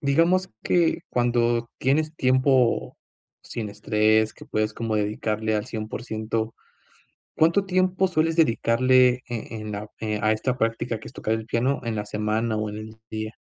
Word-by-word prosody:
digamos 165 Hz, +7 st, +2 dB
que 175 Hz, -1 st, +2 dB
cuando 120 Hz, -1 st, +1 dB
tienes 155 Hz, +4 st, +1 dB
tiempo, 130 Hz, -2 st, +2 dB, 0.5 s
sin 110 Hz, -3 st, -5 dB
estrés 110 Hz, +1 st, +2 dB
que -, -, -13 dB
puedes 110 Hz, 0 st, -1 dB
como 115 Hz, -2 st, -2 dB
dedicarle 110 Hz, +1 st, -1 dB
al 105 Hz, 0 st, -1 dB
100% 110 Hz, 0 st, -4 dB, 0.8 s
¿cuánto 170 Hz, +5 st, +3 dB
tiempo 185 Hz, 0 st, +2 dB
sueles 165 Hz, -2 st, +1 dB
dedicarle 125 Hz, -2 st, +4 dB
en 115 Hz, -2 st, -5 dB
en 105 Hz, -, -5 dB
la 105 Hz, +1 st, -5 dB
eh, 105 Hz, -1 st, -2 dB
a 110 Hz, -, +3 dB
esta 125 Hz, +4 st, -1 dB
práctica, 115 Hz, -1 st, -1 dB
que -, -, -10 dB
es -, -, -12 dB
tocar 110 Hz, -, -1 dB
el 110 Hz, 0 st, -3 dB
piano 125 Hz, +4 st, 0 dB
en 115 Hz, -2 st, -2 dB
la 105 Hz, -1 st, -3 dB
semana, 110 Hz, +2 st, -1 dB
o 105 Hz, 0 st, -2 dB
en 105 Hz, -, -6 dB
el 110 Hz, +1 st, -8 dB
día? 110 Hz, 0 st, -4 dB
115 Hz, 160 wpm, -25 LUFS, 110-130 Hz, 0.8 s, dedicarle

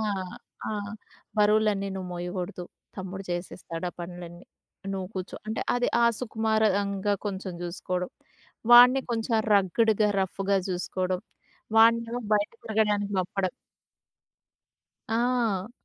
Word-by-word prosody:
ఆ! -, -, -1 dB, 0.7 s
ఆ! -, -, -2 dB, 0.7 s
బరువులన్నీ 210 Hz, -1 st, +3 dB
నువ్వు 185 Hz, -1 st, -5 dB
మోయకూడదు. 180 Hz, 0 st, -4 dB, 0.3 s
తమ్ముడు 190 Hz, +1 st, -6 dB
చేసేస్తాడు 175 Hz, -1 st, -4 dB
ఆ -, -, -29 dB
పనులన్నీ. 175 Hz, 0 st, -8 dB, 0.5 s
నువ్వు 185 Hz, -1 st, -4 dB
కూర్చో. 185 Hz, 0 st, -5 dB
అంటే 220 Hz, -, -2 dB
అది 245 Hz, 0 st, +1 dB, 0.2 s
ఆహ్, 235 Hz, 0 st, +5 dB
సుకుమారంగా 210 Hz, -3 st, +1 dB
కొంచెం 190 Hz, -2 st, -4 dB
చూసుకోవడం 180 Hz, +1 st, -3 dB, 0.6 s
వాడ్ని 250 Hz, +2 st, +9 dB
కొంచెం 225 Hz, 0 st, -1 dB, 0.2 s
రగ్గ్‌డ్‌గా 210 Hz, +2 st, +3 dB
రఫ్ఫుగా 195 Hz, +1 st, 0 dB
చూసుకోవడం, 185 Hz, 0 st, -2 dB, 0.6 s
వాడినేమో 230 Hz, +1 st, +5 dB
బయట 205 Hz, 0 st, +2 dB
తిరగడానికి 210 Hz, -2 st, +1 dB
పంపడం 185 Hz, +1 st, -1 dB, 1.6 s
ఆ! 230 Hz, -3 st, +1 dB
200 Hz, 100 wpm, -27 LUFS, 185-220 Hz, 1.6 s, వాడ్ని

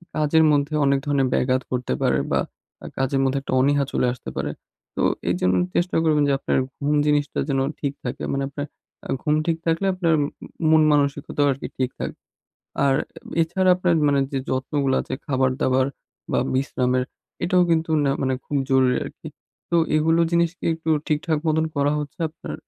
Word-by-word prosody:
কাজের 155 Hz, +1 st, +3 dB
মধ্যে 145 Hz, +1 st, +1 dB
অনেক 140 Hz, 0 st, +3 dB
ধরনের 140 Hz, -2 st, +2 dB
ব্যাঘাত 130 Hz, 0 st, +1 dB
ঘটতে 125 Hz, -, -1 dB
পারে 65 Hz, -, +2 dB
বা -, -, +2 dB, 0.4 s
আ -, -, -8 dB
কাজের 135 Hz, +1 st, 0 dB
মধ্যে 135 Hz, +1 st, +1 dB
একটা 135 Hz, -, -5 dB
অনীহা 140 Hz, +2 st, +3 dB
চলে -, -, +1 dB
আসতে 125 Hz, -, -9 dB
পারে। -, -, -2 dB, 0.4 s
তো -, -, 0 dB, 0.3 s
এইজন্য 90 Hz, +1 st, +1 dB, 0.2 s
চেষ্টা 175 Hz, +1 st, +1 dB
করবেন 155 Hz, -2 st, +3 dB
যে, -, -, +3 dB
আপনার -, -, 0 dB, 0.2 s
ঘুম 145 Hz, +1 st, +1 dB
জিনিসটা 145 Hz, -1 st, +1 dB
যেন 135 Hz, -1 st, +1 dB, 0.2 s
ঠিক 140 Hz, -1 st, -2 dB
থাকে 125 Hz, -, -5 dB
মানে 140 Hz, 0 st, -1 dB
আপনার 145 Hz, +1 st, -5 dB, 0.6 s
ঘুম 150 Hz, -1 st, +1 dB
ঠিক 165 Hz, -1 st, +1 dB
থাকলে 165 Hz, +3 st, +1 dB
আপনার 170 Hz, -3 st, +1 dB, 0.6 s
মন 160 Hz, 0 st, +6 dB
মানসিকতাও 145 Hz, 0 st, +1 dB
আরকি 135 Hz, -, -4 dB
ঠিক 130 Hz, -1 st, 0 dB
থাকবে। -, -, -5 dB, 0.7 s
আর 135 Hz, -1 st, +3 dB, 0.5 s
এছাড়া 185 Hz, +3 st, +2 dB
আপনার 180 Hz, -2 st, +2 dB
মানে 140 Hz, -1 st, +3 dB
যে, 135 Hz, -, 0 dB
যত্নগুলো 135 Hz, +1 st, 0 dB
আছে -, -, -4 dB
খাবার 130 Hz, -2 st, +2 dB
দাবার 130 Hz, -1 st, +2 dB, 0.5 s
বা -, -, +2 dB, 0.2 s
বিশ্রামের 130 Hz, -1 st, 0 dB, 0.4 s
এটাও 180 Hz, 0 st, +3 dB
কিন্তু 165 Hz, 0 st, +1 dB
নে 140 Hz, -, +2 dB
মানে 130 Hz, -1 st, +1 dB
খুব 145 Hz, -, -3 dB
জরুরি 130 Hz, -1 st, +4 dB
আরকি। -, -, -9 dB, 0.4 s
তো 170 Hz, -, +3 dB, 0.2 s
এগুলো 165 Hz, +2 st, +3 dB
জিনিসকে 170 Hz, +1 st, 0 dB
একটু 160 Hz, 0 st, -4 dB, 0.2 s
ঠিকঠাক 155 Hz, +1 st, 0 dB
মতন 160 Hz, +1 st, +2 dB
করা 140 Hz, +1 st, +2 dB
হচ্ছে 150 Hz, +4 st, -6 dB
আপনার, 155 Hz, +1 st, -8 dB
145 Hz, 170 wpm, -23 LUFS, 135-160 Hz, 0.7 s, মন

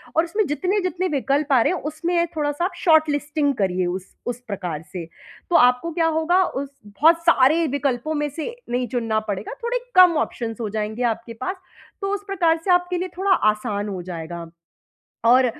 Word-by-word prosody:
और 320 Hz, -, +4 dB
उसमें 405 Hz, +5 st, 0 dB
जितने-जितने 365 Hz, +3 st, -1 dB
विकल्प 280 Hz, +1 st, 0 dB
आ 250 Hz, -, +6 dB
रहे 355 Hz, -, +2 dB
हैं, -, -, -3 dB
उसमें 340 Hz, +3 st, -1 dB
थोड़ा-सा 290 Hz, +3 st, 0 dB
आप 365 Hz, -, -2 dB
शॉर्टलिस्टिंग 295 Hz, -2 st, +2 dB
करिए 185 Hz, -2 st, 0 dB
उस 185 Hz, +1 st, -5 dB
उस 245 Hz, -1 st, -3 dB
प्रकार 180 Hz, -7 st, -4 dB
से। 175 Hz, -3 st, -5 dB, 0.5 s
तो -, -, +3 dB
आपको 250 Hz, +7 st, +4 dB
क्या 330 Hz, 0 st, +1 dB
होगा 350 Hz, +4 st, +3 dB
उस 275 Hz, +1 st, -4 dB, 0.2 s
बहुत 305 Hz, +12 st, +4 dB
सारे 325 Hz, +1 st, +5 dB
विकल्पों 280 Hz, +1 st, -1 dB
में 295 Hz, 0 st, -1 dB
से 320 Hz, -, -6 dB
नहीं 245 Hz, 0 st, -1 dB
चुनना 225 Hz, -3 st, 0 dB
पड़ेगा, 200 Hz, +1 st, -3 dB
थोड़े 480 Hz, +1 st, 0 dB, 0.2 s
कम 360 Hz, -3 st, +7 dB
ऑप्शंस 225 Hz, -2 st, -6 dB
हो 215 Hz, -, -2 dB
जाएँगे 215 Hz, +3 st, -3 dB
आपके 230 Hz, +1 st, -11 dB
पास, 255 Hz, -, -4 dB, 0.5 s
तो 395 Hz, -, -1 dB
उस 405 Hz, 0 st, -3 dB
प्रकार 335 Hz, -4 st, +2 dB
से 370 Hz, -, +3 dB
आपके 355 Hz, 0 st, +2 dB
लिए 365 Hz, +1 st, -3 dB
थोड़ा 390 Hz, +1 st, +1 dB, 0.2 s
आसान 210 Hz, -1 st, -4 dB
हो 190 Hz, -3 st, -4 dB
जाएगा। 170 Hz, -1 st, -6 dB, 0.8 s
और 250 Hz, +2 st, +6 dB
290 Hz, 180 wpm, -22 LUFS, 225-345 Hz, 0.8 s, कम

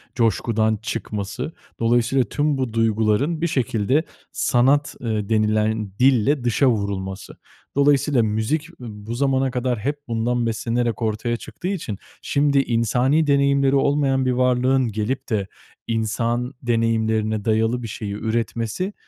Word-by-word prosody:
coşkudan 110 Hz, -1 st, +1 dB
çıkması. 105 Hz, +4 st, -4 dB, 0.3 s
Dolayısıyla 120 Hz, +3 st, +2 dB
tüm 145 Hz, +6 st, 0 dB
bu 130 Hz, -4 st, -2 dB
duyguların 115 Hz, +8 st, +1 dB
bir 170 Hz, -, +2 dB
şekilde 130 Hz, +1 st, +1 dB, 0.3 s
sanat, 140 Hz, +3 st, +2 dB
ııı, 110 Hz, -3 st, -2 dB
denilen 110 Hz, -1 st, +1 dB
dille 130 Hz, +1 st, +3 dB
dışa 120 Hz, +3 st, +2 dB
vurulması. 100 Hz, -3 st, -3 dB, 0.4 s
Dolayısıyla 140 Hz, -3 st, +3 dB
müzik 110 Hz, +10 st, -1 dB
bu 110 Hz, -1 st, -7 dB
zamana 135 Hz, 0 st, +1 dB
kadar 125 Hz, -2 st, -1 dB
hep 145 Hz, +5 st, -2 dB
bundan 120 Hz, +1 st, 0 dB
beslenerek 115 Hz, +1 st, -1 dB
ortaya 115 Hz, +1 st, -1 dB
çıktığı 180 Hz, -, -8 dB
için, 155 Hz, -, -3 dB, 0.2 s
şimdi, 140 Hz, -1 st, +2 dB
insani 125 Hz, +6 st, +1 dB
deneyimleri 140 Hz, -1 st, +3 dB
olmayan 135 Hz, -1 st, +2 dB
bir 130 Hz, -, +2 dB
varlığın 125 Hz, +1 st, +2 dB
gelip 110 Hz, +7 st, -3 dB
de 100 Hz, -3 st, -1 dB, 0.4 s
insan 115 Hz, +3 st, -1 dB
deneyimlerine 110 Hz, -2 st, 0 dB
dayalı 115 Hz, +2 st, +1 dB
bir -, -, -4 dB
şeyi 105 Hz, -1 st, -5 dB
üretmesi, 115 Hz, -, -2 dB
120 Hz, 125 wpm, -22 LUFS, 110-135 Hz, 0.4 s, dille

